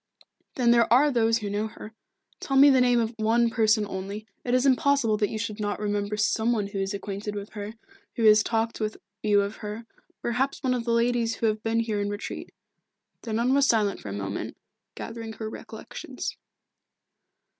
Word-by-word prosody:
"Then 240 -2 +3
there 235 -1 +4
are 280 +5 +6
those 230 -2 +3
who 210 -3 -4
know 210 +2 -1
her. 220 0 -11 0.5
Tell 270 - -1
me 280 +1 +8
the 260 -1 +5
name 245 -1 +4
of 230 0 -1
one 230 +2 +2
person 220 -1 +3
only 200 +2 -6 0.2
it 245 0 +1
is 255 +2 +2
impossible 275 -4 +3
that 210 -2 +1
you 220 - -4
should 215 -1 -4
not 205 -1 -2
remember 205 0 -1
some 220 +2 +1
one 210 -3 0
who 200 0 -5
is 195 +1 -2
acquainted 200 +1 -5
with 205 0 -6
her, 210 +1 -7 0.4
who 235 - -1
has 215 -1 +7
talked 225 +1 -1
with 215 -1 -2 0.2
you 205 -1 +4
of 200 +2 -4
her 210 +2 -6 0.4
perhaps 255 +4 -1
one 255 -1 +2
of 240 -2 -2
the 235 - 0
ladies 235 -1 +1
who - - -2
have 215 -1 +1
been 225 +1 +1
here 215 -3 -1
in 205 - -1
retreat." 205 0 -6 0.7
The 230 - -6
nun 235 +4 +2
was 280 0 +4
silent 210 -5 +2
for 105 - -8
a - - -5
moment, 100 -1 -4 0.4
gathering 225 -1 -6
her 220 +1 -6
recollections. 220 - -7
220 Hz, 200 wpm, -26 LUFS, 210-235 Hz, 0.7 s, me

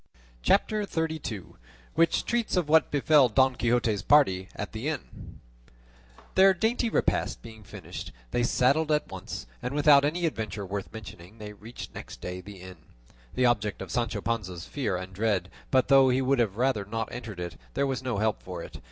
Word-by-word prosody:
CHAPTER 215 - +2
XXXII. 160 - -3 0.5
WHICH 165 +1 +2
TREATS 235 -5 0
OF 175 -4 +1
WHAT 160 0 +4
BEFELL 145 -2 +4
DON 130 +2 +3
QUIXOTE'S 120 -4 +1
PARTY 95 -11 +4
AT 105 - -5
THE 110 +6 -4
INN 155 -4 -6 0.9
Their 190 0 +6
dainty 230 +5 +1
repast - - 0
being 110 -1 -11
finished, 90 - -8 0.2
they 120 - +1
saddled 140 +6 +2
at 150 0 0
once, 95 +4 -6 0.2
and 125 +3 -3
without 145 -1 +6
any 170 +4 0
adventure 110 -8 -3
worth 100 0 -5
mentioning 105 -2 -10
they 105 -1 -8
reached 110 +4 -10
next - - -9
day 90 0 -6
the 100 0 -11
inn, 95 0 -10 0.6
the 130 - +3
object 105 -4 +1
of 95 -3 -7
Sancho 115 -2 -1
Panza's 95 -7 -3
fear 110 -10 -2
and 95 +1 -7
dread; 100 -3 0 0.2
but 130 -1 +3
though 135 -1 +6
he 125 +1 +2
would 135 0 +2
have 105 -4 +1
rather 125 -4 +1
not 115 +2 -4
entered 115 -6 -7
it, 85 -1 -5 0.2
there - - +2
was 135 -2 -2
no 125 -5 -2
help 110 +1 0
for 90 -2 -7
it. - - -10
115 Hz, 180 wpm, -28 LUFS, 100-145 Hz, 0.9 s, Their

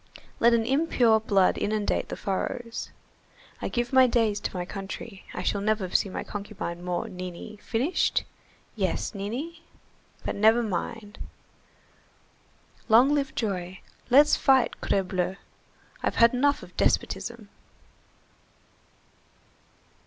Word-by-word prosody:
Let 235 0 +5
an 225 -1 +1
impure 255 -5 +3
blood 200 -4 +2
inundate 210 0 -1
the - - -4
furrows! 230 +4 -3 0.7
I - - -2
give 240 +1 -2
my 260 -1 +7
days 225 -4 +1
to - - -4
my 180 - -2
country, 195 +1 -7
I 180 - -5
shall 200 +2 0
never 210 -2 0
see 195 - +2
my - - -4
concubine 200 -4 -6
more, 180 -1 -2
Nini, 185 +3 -8
finished, 255 +10 0 0.5
yes, - - -1
Nini? 250 +12 -5 0.6
But - - -1
never 220 +3 +4
mind! 210 +1 -4 1.7
Long 245 +6 +6
live 280 -2 -1
joy! 185 -4 -3 0.3
Let's 290 +4 +6
fight, 265 -3 +3
crebleu! 190 -1 0 0.7
I've - - -1
had 235 +1 +5
enough 285 +3 +2
of - - -14
despotism." - - -1
220 Hz, 115 wpm, -27 LUFS, 195-245 Hz, 1.7 s, my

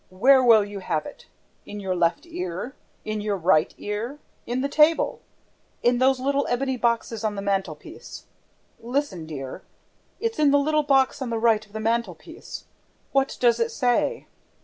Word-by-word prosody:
Where 260 +9 +5
will 225 -4 +6
you 205 -1 -7
have 165 -5 -2
it? 290 - -11 0.4
In 205 - -8
your 190 -2 -2
left 175 - +1
ear? 245 - -5 0.3
In 215 -1 -3
your 205 -1 -1
right 170 -3 +3
ear? 220 +7 -4 0.3
In 245 +2 -1
the 280 - 0
table? 305 +3 +3 0.6
In 240 0 +3
those 260 0 +3
little 280 +2 0
ebony 265 +2 0
boxes 235 -2 -1
on 215 -1 -1
the 200 - -4
mantelpiece?... 195 -1 -4 0.5
Listen, 235 - -3
dear, 135 -4 -7 0.6
it's 460 -4 -2
in 300 -2 +5
the 285 - +5
little 305 +2 +2
box 270 -2 +2
on 260 - -3
the 230 - -1
right 225 -1 +3
of 210 -1 -21
the 220 - -4
mantelpiece: 230 - -3 0.5
what 275 0 +1
does 240 -2 +3
it 465 - +1
say? 285 - 0
235 Hz, 170 wpm, -24 LUFS, 205-275 Hz, 0.6 s, will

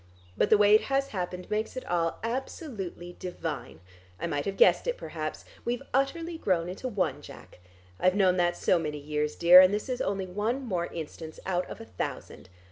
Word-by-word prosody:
But 205 - +2
the 215 - +7
way 205 0 +5
it 215 - +5
has 275 0 +1
happened 180 -2 -4
makes 215 +4 -2
it 255 - -5
all 170 -1 0
absolutely 230 - -5
divine. 170 - -5 0.4
I - - -2
might 145 0 -2
have 195 0 -3
guessed - - +5
it - - 0
perhaps. - - -5 0.2
We've 245 +2 -2
utterly 325 +5 0
grown 175 - +1
into 190 +8 -5
one, 205 -6 -1
Jack; - - -13 0.4
I've 185 +1 +3
known 185 -2 +4
that 175 -1 +2
so 180 - +3
many 150 -2 -3
years, 150 +1 -2
dear, 175 +2 +9
and 185 0 +5
this 210 +1 -2
is 250 - -2
only 195 -1 -1
one 215 +8 -2
more 180 -6 -1
instance 160 0 -8
out 180 -1 -1
of - - -8
a 225 - -9
thousand. 95 - -6
185 Hz, 195 wpm, -28 LUFS, 175-230 Hz, 0.4 s, dear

